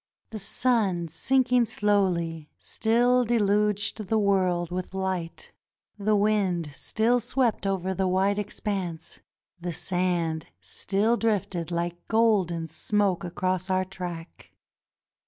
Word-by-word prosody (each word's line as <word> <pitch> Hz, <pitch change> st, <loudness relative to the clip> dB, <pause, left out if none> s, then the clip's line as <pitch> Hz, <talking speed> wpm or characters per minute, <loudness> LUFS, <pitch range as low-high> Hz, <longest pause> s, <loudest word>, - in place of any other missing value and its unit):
The 220 Hz, -, -5 dB
sun, 200 Hz, -5 st, +1 dB
sinking 250 Hz, -, +2 dB
slowly, 180 Hz, -8 st, 0 dB
still 245 Hz, +3 st, +2 dB
deluged 210 Hz, -2 st, +1 dB
the 220 Hz, -, +2 dB
world 185 Hz, -4 st, +1 dB
with 185 Hz, +1 st, -4 dB
light; 185 Hz, -3 st, -3 dB, 0.4 s
the 210 Hz, +1 st, +1 dB
wind 200 Hz, -6 st, +1 dB
still 225 Hz, -, +1 dB
swept 240 Hz, -3 st, 0 dB
over 190 Hz, -1 st, -1 dB
the 190 Hz, 0 st, 0 dB
wide 195 Hz, +2 st, +2 dB
expanse; 195 Hz, -5 st, -3 dB, 0.4 s
the 175 Hz, 0 st, -4 dB
sand 175 Hz, -2 st, -1 dB
still 210 Hz, +5 st, +1 dB
drifted 195 Hz, -7 st, -1 dB
hke 170 Hz, 0 st, -2 dB
golden 200 Hz, -8 st, +2 dB
smoke 195 Hz, +3 st, 0 dB
across 185 Hz, +1 st, -2 dB
our 185 Hz, 0 st, +1 dB
track. 175 Hz, -3 st, -8 dB
195 Hz, 110 wpm, -26 LUFS, 175-215 Hz, 0.4 s, sinking